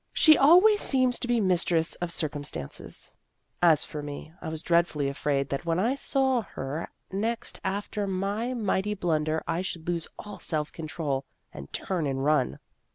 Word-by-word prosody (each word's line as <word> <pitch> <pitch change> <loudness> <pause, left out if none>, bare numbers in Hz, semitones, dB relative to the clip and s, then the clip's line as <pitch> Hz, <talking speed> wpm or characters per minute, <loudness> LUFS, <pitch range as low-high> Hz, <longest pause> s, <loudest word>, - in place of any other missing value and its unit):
She 310 -1 +7
always 365 +10 +6
seems 255 -2 +4
to 245 - -4
be 240 -1 +2
mistress 175 -4 +2
of 175 - -1
circumstances. 145 - -4 0.5
As 165 -4 +6
for 150 - -6
me, 145 +2 -8
I - - -4
was 160 0 -3
dreadfully 170 -4 +2
afraid 140 0 -1
that 140 - -2
when 165 -1 0
I 225 +8 +2
saw 265 -2 +1
her 145 -5 -5 0.2
next 225 +4 -2
after 200 +1 -2
my 200 +6 -2
mighty 210 -2 0
blunder 160 -4 0
I 165 +2 0
should 170 -3 -5
lose 170 -2 -1
all 210 -1 -9
self 155 -2 -2
control, 155 -4 -3 0.3
and 70 +1 -9
turn 175 -6 -2
and 135 0 -2
run. 150 - +2
170 Hz, 160 wpm, -27 LUFS, 150-210 Hz, 0.5 s, She